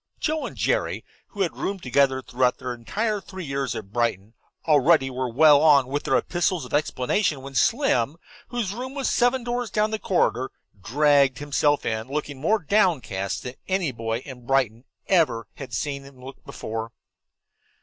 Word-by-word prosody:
Joe 310 0 -1
and - - -10
Jerry, - - 0 0.2
who 205 - -6
had 180 - 0
roomed 195 -2 -4
together 130 +1 +2
throughout 125 0 +1
their 125 -1 -4
entire 210 - -2
three 190 -2 -8
years 135 -2 -2
at 105 -2 -8
Brighton, 115 -3 -1 0.3
already 145 -2 +4
were 130 0 -2
well 145 +3 +6
on 145 -4 +6
with 145 +2 -2
their - - +3
epistles 175 -3 -1
of - - -12
explanation 145 - 0
when 135 0 -8
Slim, 160 - +2 0.3
whose 230 -6 -3
room 260 +4 -6
was 275 -2 -1
seven 245 +1 +2
doors 245 -1 -2
down 215 +2 +1
the 220 - -2
corridor, 130 - +1 0.3
dragged 140 +4 +3
himself 145 0 +1
in, 110 +1 -2
looking 145 -1 -4
more 215 +9 +3
downcast 150 - 0
than 125 - -6
any 185 -6 0
boy 115 0 -3
in 125 -3 -10
Brighton 130 -3 +1 0.2
ever 150 -12 +2
had 135 - -8
seen 140 -2 -3
him 135 -1 -15
look 135 - -11
before. 115 +1 -5
140 Hz, 170 wpm, -24 LUFS, 125-190 Hz, 0.3 s, well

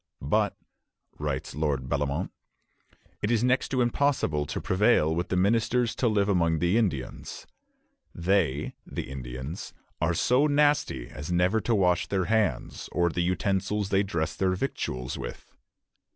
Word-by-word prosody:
"But," - - +1 0.6
writes 75 -3 -3
Lord 70 -3 -1
Bellomont, 70 +1 -1 0.9
"it 105 - 0
is 120 -1 +2
next 125 +1 +2
to 130 -2 +1
impossible 120 - +1
to - - -3
prevail 95 -5 +3
with 85 +2 -2
the - - 0
ministers 115 +5 +2
to 125 - +2
live 105 -3 +2
among 85 -5 +2
the 85 +5 +1
Indians. 90 - -2 0.7
They 85 -5 +1
[the - - -6
Indians] 65 +5 -6 0.3
are 85 0 +2
so 130 - +3
nasty 145 - +2
as 75 +5 -7
never 90 +5 +2
to 115 - +1
wash 90 -3 +2
their 95 -2 0
hands, 110 -1 0
or 85 -1 +2
the 90 - -1
utensils 95 +3 0
they 95 0 +3
dress 85 -6 -2
their 95 -1 +1
victuals 65 - -3
with." - - -8
90 Hz, 145 wpm, -27 LUFS, 75-110 Hz, 0.9 s, prevail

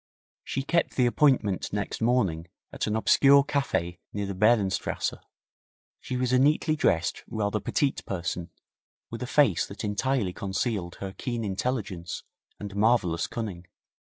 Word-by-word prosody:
She 135 - -3
kept 170 +4 0
the 125 - +3
appointment 120 -7 +2
next 105 +2 -3
morning 100 -9 +1 0.3
at - - -2
an 105 - 0
obscure 140 +5 +5
cafe 135 - -1
near 100 0 -3
the 100 - -4
Behrenstrasse. 105 -1 +1 0.9
She 125 - -4
was 125 0 0
a 125 - +5
neatly 155 +3 +3
dressed, 85 - +1
rather 105 -1 -1
petite 140 +3 0
person, 90 -2 -3 0.6
with 115 - -6
a 125 - -3
face 130 - +3
that 100 - -8
entirely 105 -1 0
concealed 95 -2 -2
her 95 -1 -5
keen 120 -4 -3
intelligence 95 -4 -3 0.4
and 100 -1 -7
marvellous 100 -6 +2
cunning. 95 -7 -5
105 Hz, 140 wpm, -27 LUFS, 95-130 Hz, 0.9 s, obscure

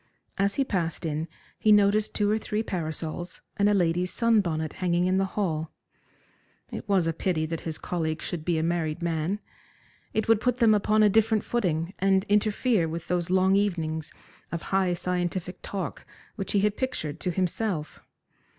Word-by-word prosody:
As 200 +1 +2
he 275 - +2
passed 170 - -2
in 155 +1 -2 0.3
he 215 - +4
noticed 210 +1 +4
two 205 - +2
or 215 - +2
three 215 0 -2
parasols 165 -1 -4 0.2
and 205 0 +4
a - - +4
lady's 180 0 +1
sun 230 -3 +3
bonnet 160 -4 -2
hanging 175 -1 +2
in 185 +1 +2
the 195 - +2
hall. 160 -6 -1 1.0
It - - -7
was 190 -4 +3
a 165 - 0
pity 160 -1 0
that 165 0 -3
his 155 - -5
colleague 160 -3 -2
should 170 -3 -4
be 170 0 +1
a 160 - 0
married 165 -1 -1
man. 170 +4 -1 0.7
It 220 - -1
would 225 -1 +4
put 250 -1 +1
them 230 -3 +5
upon 215 +1 +3
a - - +7
different 220 +1 +3
footing, 180 -6 -1
and 195 0 +3
interfere 210 -2 +2
with 165 +1 -6
those 175 -1 0
long 190 +1 +4
evenings 160 -6 -1 0.4
of 170 - -4
high 190 -2 +3
scientific 180 0 -2
talk 195 -3 -5 0.3
which 195 -4 -4
he 200 - +3
had 210 0 +1
pictured 165 - -3
to 180 - -1
himself. 180 -2 -2
180 Hz, 180 wpm, -27 LUFS, 165-205 Hz, 1.0 s, a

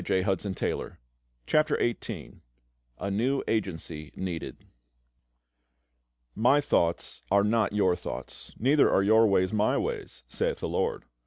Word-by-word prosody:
CHAPTER 95 +1 -1 0.9
XVIII 120 -1 -4 0.6
A 100 - -3
NEW 130 +7 0
AGENCY 80 -7 -3
NEEDED 90 -3 -5 1.7
"My 125 +6 +4
thoughts 85 -12 0
are 100 +1 +4
not 110 0 +1
your 95 -4 +3
thoughts, - - -8
neither 140 +5 +4
are 95 - +3
your 110 +2 +5
ways 95 -1 +2
My 105 0 +2
ways, 65 - -4
saith - - -1
the - - -3
LORD. - - -1
100 Hz, 110 wpm, -28 LUFS, 90-115 Hz, 1.7 s, your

